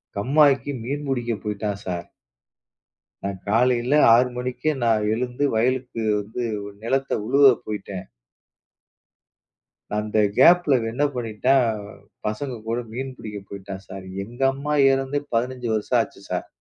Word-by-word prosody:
கம்மாக்கி 140 Hz, +5 st, +3 dB
மீன் 145 Hz, +4 st, -3 dB
புடிக்கப் 120 Hz, -5 st, -2 dB
போயிட்டான் 105 Hz, -1 st, -3 dB
சார். 90 Hz, -2 st, -4 dB, 1.2 s
நான் 100 Hz, -1 st, -3 dB
காலையில 125 Hz, +3 st, +2 dB, 0.2 s
6 125 Hz, +2 st, +3 dB
மணிக்கு 125 Hz, +5 st, -2 dB
நான் 110 Hz, -2 st, +2 dB
எழுந்து 125 Hz, +4 st, -1 dB
வயலுக்கு 125 Hz, 0 st, 0 dB, 0.2 s
வந்து 110 Hz, +4 st, -5 dB, 0.2 s
ஒரு 100 Hz, -, -9 dB
நிலத்த 135 Hz, +3 st, 0 dB, 0.2 s
உழுவ 140 Hz, +3 st, +5 dB, 0.2 s
போயிட்டேன். 100 Hz, -3 st, -6 dB, 1.9 s
அந்த 105 Hz, +1 st, -1 dB, 0.2 s
கேப்ல 170 Hz, -1 st, +6 dB
அவன் 115 Hz, -2 st, -2 dB
என்ன 140 Hz, +5 st, 0 dB
பண்ணிட்டான், 115 Hz, -1 st, +1 dB, 0.4 s
பசங்க 120 Hz, +5 st, -3 dB
கூட 115 Hz, +1 st, 0 dB
மீன் 130 Hz, +2 st, -4 dB
பிடிக்கப் 105 Hz, -2 st, -8 dB
போயிட்டான் 100 Hz, -1 st, -8 dB
சார். 95 Hz, -1 st, -8 dB, 0.2 s
எங்க 120 Hz, +5 st, -11 dB
அம்மா 145 Hz, +2 st, -3 dB, 0.2 s
எறந்தே 135 Hz, +2 st, -1 dB, 0.2 s
15 125 Hz, 0 st, -1 dB
வருஷம் 110 Hz, -, +1 dB
ஆச்சு -, -, -7 dB
சார் -, -, -3 dB
120 Hz, 125 wpm, -23 LUFS, 105-135 Hz, 1.9 s, கேப்ல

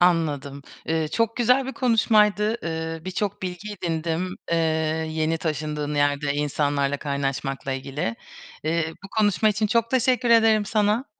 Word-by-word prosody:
Anladım. 145 Hz, -5 st, +1 dB, 0.2 s
Eee, 160 Hz, -1 st, 0 dB
çok 230 Hz, +5 st, 0 dB
güzel 250 Hz, +2 st, +3 dB
bir 265 Hz, -, -4 dB
konuşmaydı. 220 Hz, -2 st, +3 dB
Eee, 160 Hz, 0 st, -4 dB
bir 185 Hz, -, -4 dB
çok 200 Hz, 0 st, -3 dB
bilgi 185 Hz, +3 st, -5 dB
edindim, 170 Hz, +2 st, -2 dB
eee, 170 Hz, -, +2 dB, 0.5 s
yeni 160 Hz, +1 st, 0 dB
taşındığın 150 Hz, -2 st, -3 dB
yerde 145 Hz, 0 st, +1 dB
insanlarla 145 Hz, -1 st, 0 dB
kaynaşmakla 135 Hz, -1 st, -3 dB
ilgili. 135 Hz, -3 st, -3 dB, 0.5 s
Eee, 160 Hz, 0 st, 0 dB
bu -, -, -8 dB
konuşma 210 Hz, +1 st, +3 dB
için 215 Hz, +1 st, +1 dB
çok 230 Hz, +1 st, +1 dB
teşekkür 255 Hz, -1 st, +2 dB
ederim 225 Hz, -2 st, +5 dB
sana. 215 Hz, +3 st, +1 dB
165 Hz, 140 wpm, -24 LUFS, 150-215 Hz, 0.5 s, ederim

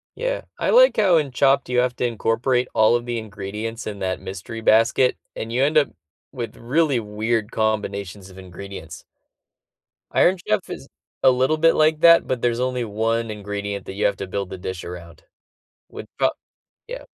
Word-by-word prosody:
Yeah, -, -, -2 dB
I -, -, -1 dB
like -, -, +6 dB
how 190 Hz, -6 st, +4 dB
in 145 Hz, -4 st, -1 dB
Chopped 140 Hz, +2 st, +2 dB
you 125 Hz, 0 st, +1 dB
have 125 Hz, 0 st, +1 dB
to 125 Hz, -, 0 dB
incorporate 120 Hz, +2 st, 0 dB
all 110 Hz, +2 st, +4 dB
of 120 Hz, 0 st, -2 dB
the 120 Hz, -1 st, -3 dB
ingredients 105 Hz, +2 st, -6 dB
in 105 Hz, -2 st, -6 dB
that 95 Hz, -1 st, -2 dB
mystery 100 Hz, +4 st, -7 dB
basket, 115 Hz, +3 st, +3 dB, 0.2 s
and 115 Hz, -, -5 dB
you 125 Hz, +3 st, 0 dB
end 150 Hz, +3 st, +2 dB
up 145 Hz, -, +4 dB, 0.4 s
with 120 Hz, -5 st, -6 dB
really 140 Hz, +1 st, +1 dB
weird 110 Hz, +1 st, -2 dB
combinations 100 Hz, -3 st, -2 dB
of 95 Hz, -, -15 dB
ingredients. 95 Hz, +1 st, -10 dB, 1.1 s
Iron 185 Hz, +2 st, +3 dB
Chef 105 Hz, -, 0 dB
is -, -, -8 dB, 0.4 s
a 130 Hz, -, +7 dB
little 130 Hz, +5 st, +1 dB
bit 165 Hz, +1 st, +4 dB
like 155 Hz, 0 st, +3 dB
that, 170 Hz, 0 st, +7 dB
but 130 Hz, -2 st, -2 dB
there's 120 Hz, -1 st, 0 dB
only 125 Hz, -1 st, -1 dB
1 115 Hz, +1 st, -1 dB
ingredient 100 Hz, -1 st, -5 dB
that -, -, -7 dB
you 100 Hz, -, 0 dB
have 100 Hz, -, +1 dB
to 95 Hz, -, -5 dB
build 100 Hz, 0 st, -4 dB
the -, -, -7 dB
dish 90 Hz, 0 st, -6 dB
around, 85 Hz, -2 st, -10 dB, 0.7 s
wi -, -, -9 dB
pro -, -, +3 dB, 0.6 s
yeah. -, -, -7 dB
115 Hz, 180 wpm, -22 LUFS, 100-130 Hz, 1.1 s, a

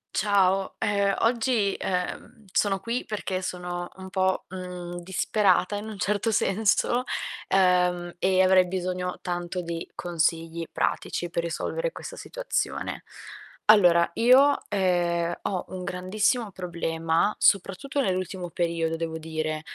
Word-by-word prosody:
Ciao, 195 Hz, -2 st, +2 dB
ehm, 200 Hz, -1 st, +1 dB
oggi, 230 Hz, -3 st, +1 dB
uhm, 190 Hz, +5 st, -3 dB
sono 195 Hz, 0 st, +1 dB
qui 230 Hz, +6 st, -3 dB
perché 190 Hz, -3 st, -3 dB
sono 175 Hz, -1 st, -4 dB
un 190 Hz, 0 st, -9 dB
po', 190 Hz, -1 st, 0 dB
mhmm, 180 Hz, -1 st, -6 dB
disperata 190 Hz, +1 st, +2 dB
in 205 Hz, +2 st, -5 dB
un 215 Hz, -2 st, -8 dB
certo 210 Hz, +4 st, 0 dB
senso 220 Hz, +4 st, +2 dB, 0.5 s
uhm, 180 Hz, -2 st, +3 dB
e 185 Hz, +1 st, +3 dB
avrei 185 Hz, 0 st, +5 dB
bisogno 180 Hz, 0 st, -3 dB
tanto 175 Hz, 0 st, -3 dB
di 170 Hz, -1 st, -5 dB
consigli 165 Hz, -1 st, -1 dB
pratici 175 Hz, -, -1 dB
per 170 Hz, 0 st, -2 dB
risolvere -, -, -2 dB
questa -, -, -8 dB
situazione. -, -, -3 dB, 0.6 s
Allora, 175 Hz, -5 st, +6 dB
io, 265 Hz, +4 st, +6 dB
ehm, 175 Hz, -3 st, +1 dB
ho 185 Hz, -3 st, -2 dB
un 185 Hz, -1 st, -6 dB
grandissimo 205 Hz, +5 st, 0 dB
problema, 165 Hz, 0 st, -1 dB
soprattutto 200 Hz, +9 st, +2 dB
nell'ultimo 185 Hz, -4 st, -2 dB
periodo, 165 Hz, -1 st, -1 dB
devo 160 Hz, -1 st, -4 dB
dire, 155 Hz, -1 st, -3 dB
185 Hz, 120 wpm, -26 LUFS, 175-205 Hz, 0.6 s, Allora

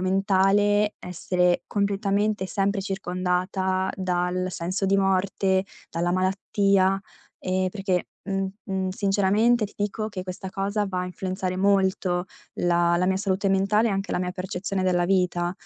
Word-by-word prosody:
mentale 195 Hz, +2 st, +2 dB
essere 180 Hz, 0 st, 0 dB
completamente 200 Hz, 0 st, 0 dB
e 185 Hz, -, -6 dB
sempre 200 Hz, +2 st, 0 dB
circondata 185 Hz, 0 st, -1 dB
dal 180 Hz, 0 st, -1 dB
senso 185 Hz, +3 st, -2 dB
di 195 Hz, +1 st, +3 dB
morte, 190 Hz, 0 st, +1 dB, 0.3 s
dalla 175 Hz, +1 st, -1 dB
malattia, 195 Hz, +1 st, +2 dB, 0.4 s
ehm, 185 Hz, 0 st, 0 dB
perché, 190 Hz, -3 st, -1 dB, 0.2 s
mhmm, 195 Hz, -1 st, -1 dB, 0.2 s
mhmm, 190 Hz, -2 st, -2 dB
sinceramente 205 Hz, +4 st, +2 dB
ti 205 Hz, -, -19 dB
dico 210 Hz, +1 st, -2 dB
che 195 Hz, -3 st, -5 dB
questa 185 Hz, +1 st, -6 dB
cosa 200 Hz, +2 st, -1 dB
va 185 Hz, -2 st, -2 dB
a 180 Hz, -, -2 dB
influenzare 185 Hz, 0 st, -3 dB
molto 190 Hz, -2 st, +1 dB, 0.3 s
la 175 Hz, 0 st, +2 dB
la 180 Hz, +1 st, +1 dB
mia 190 Hz, -, +2 dB
salute 195 Hz, 0 st, 0 dB
mentale 200 Hz, +4 st, +2 dB
e 205 Hz, -, 0 dB
anche 195 Hz, +1 st, -2 dB
la -, -, 0 dB
mia 180 Hz, -, -2 dB
percezione 185 Hz, +1 st, -3 dB
della 175 Hz, -1 st, +2 dB
vita, 180 Hz, -2 st, +1 dB
190 Hz, 145 wpm, -25 LUFS, 185-200 Hz, 0.4 s, di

